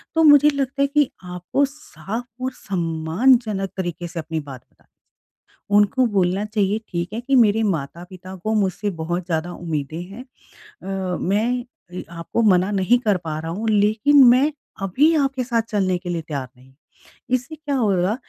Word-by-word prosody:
तो 325 - +4
मुझे 295 -1 +7
लगता 275 -1 -2
है 280 - +4
कि 290 -1 +2
आपको 180 +10 -1
साफ 245 -5 -7 0.2
और 260 0 -1
सम्मानजनक 195 +4 0
तरीके 175 -2 -4
से 170 0 -6
अपनी 160 0 -4
बात 135 -5 -9
बतानी - - -34 0.7
चाहिए। 205 - -2
उनको 225 +5 +3
बोलना 190 +1 +1
चाहिए 210 -1 0
ठीक 175 +2 -4
है, 225 - -3
कि 270 +3 -1
मेरे 225 -2 +4
माता-पिता 180 +2 -4
को 220 +1 0
मुझसे 205 0 0
बहुत 175 +2 -3
ज़्यादा 170 0 -2
उम्मीदें 160 -2 -4
हैं। 200 +7 -10 0.6
अ, 190 -2 -3
मैं 230 +6 0 0.3
अ, 180 - -5
आपको 170 +7 -3
मना 190 -3 +3
नहीं 200 +5 +3
कर 210 -6 +1
पा 155 -2 -4
रहा 165 +1 -5
हूँ 210 +6 -4
लेकिन 220 +7 +4
मैं 260 +5 +5 0.3
अभी 265 - +3
आपके 275 -3 0
साथ 235 -2 0
चलने 190 -4 +1
के 175 0 -8
लिए 170 -2 -2
तैयार 140 -5 -5
नहीं। 130 +1 -20 0.6
इससे 255 +5 -2
क्या 295 -2 -4
होगा 200 -5 +1
200 Hz, 170 wpm, -21 LUFS, 175-245 Hz, 0.7 s, मुझे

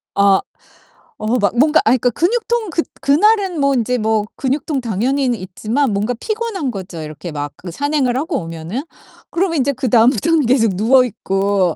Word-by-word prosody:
아. 200 -1 +4 0.8
어 220 +4 0
막 205 +3 0
뭔가 300 +5 +4
아이 255 - +4
그러니까 245 - +2
근육통 455 +4 0
그 330 - +1 0.2
그날은 380 +3 +2
뭐 280 0 +3
인제 250 +1 0
뭐 215 -1 +1
근육통 275 +1 -2
당연히는 245 +3 0
있지만 215 +7 -1
뭔가 210 +5 0
피곤한 435 - -3
거죠, 185 -5 -7
이렇게 155 +3 -7
막 145 -1 -5
그 180 - -9
산행을 280 - 0
하고 300 +2 -1
오면은. 165 +8 -5 0.5
그러면 340 -3 0
이제 275 +2 +2
그다음부터는 255 +5 +2
계속 230 -6 +2
누워 250 +6 +4
있고 195 -5 0
250 Hz, 350 characters per minute, -18 LUFS, 200-295 Hz, 0.8 s, 아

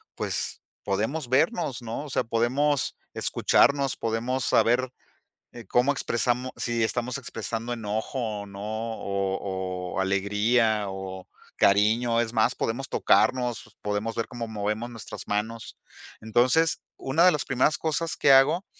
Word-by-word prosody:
pues, - - -3 0.2
podemos 115 +8 -2
vernos, 140 - +1
¿no? 120 +5 -5
O - - -9
sea, - - 0
podemos 130 +6 +1 0.2
escucharnos, 140 -2 +2
podemos 120 +3 -1
saber, 125 +2 +3 0.6
eh, 120 -2 -10
cómo 125 +3 +3
expresamo 125 0 0
si 120 -1 0
estamos 120 +2 -1
expresando 115 -2 -5
enojo, 110 +3 -3 0.2
o - - -8
no, 100 0 -10
o 100 -4 -3
o - - +1
alegría, 105 +3 +2
o 95 -1 -7 0.3
cariño. 110 +4 +3
Es 115 -1 -3
más, 110 -2 +2
podemos 120 +4 -3
tocarnos, 125 -3 +1
podemos 105 +2 -2
ver 115 - -2
cómo 120 -1 -6
movemos 105 +2 -3
nuestras 115 -3 -8
manos". 110 +2 -3 0.4
Entonces, 125 +9 +2 0.2
una 140 +6 +1
de 185 - +7
las 150 - -1
primeras 135 +4 +2
cosas 160 +1 -1
que 140 - +5
hago 150 +8 +5
115 Hz, 135 wpm, -26 LUFS, 105-130 Hz, 0.6 s, de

